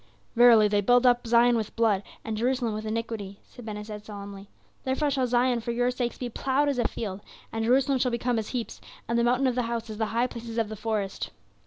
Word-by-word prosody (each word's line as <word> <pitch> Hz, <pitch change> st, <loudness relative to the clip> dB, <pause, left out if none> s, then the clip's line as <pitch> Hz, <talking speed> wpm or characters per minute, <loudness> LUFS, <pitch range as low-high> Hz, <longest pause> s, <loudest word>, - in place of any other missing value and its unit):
"'Verily, 230 Hz, -3 st, +7 dB
they 205 Hz, 0 st, +2 dB
build 245 Hz, +5 st, +4 dB
up 245 Hz, -1 st, +3 dB
Zion 240 Hz, +1 st, +5 dB
with 220 Hz, -2 st, -3 dB
blood, 220 Hz, -4 st, +2 dB, 0.2 s
and 220 Hz, -, -3 dB
Jerusalem 240 Hz, 0 st, 0 dB
with 215 Hz, +1 st, -5 dB
iniquity," 215 Hz, -3 st, -4 dB
said 245 Hz, -, -14 dB
Ben 215 Hz, -2 st, -5 dB
Hesed 210 Hz, 0 st, -7 dB
solemnly. 200 Hz, -1 st, -9 dB, 0.3 s
"'Therefore 275 Hz, +3 st, 0 dB
shall 260 Hz, -2 st, +1 dB
Zion 245 Hz, 0 st, +2 dB
for 230 Hz, -, -6 dB
your 245 Hz, +1 st, +1 dB
sakes 245 Hz, -1 st, -3 dB
be 250 Hz, -, -4 dB
plowed 270 Hz, +4 st, 0 dB
as 275 Hz, -3 st, -1 dB
a 240 Hz, -, +2 dB
field, 200 Hz, -3 st, -5 dB, 0.3 s
and 225 Hz, 0 st, -2 dB
Jerusalem 260 Hz, +2 st, +3 dB
shall 250 Hz, -, +2 dB
become 235 Hz, 0 st, 0 dB
as 215 Hz, -, -4 dB
heaps; 245 Hz, -3 st, -4 dB, 0.3 s
and 235 Hz, +1 st, +1 dB
the -, -, +2 dB
mountain 250 Hz, +3 st, +2 dB
of 255 Hz, -, +2 dB
the 250 Hz, -, 0 dB
house 230 Hz, -1 st, -3 dB
as 215 Hz, -, -8 dB
the 220 Hz, -, +1 dB
high 230 Hz, +3 st, +1 dB
places 235 Hz, -2 st, -7 dB
of 225 Hz, -2 st, 0 dB
the 215 Hz, -, -5 dB
forest. 210 Hz, -2 st, -3 dB
235 Hz, 230 wpm, -27 LUFS, 215-245 Hz, 0.3 s, Verily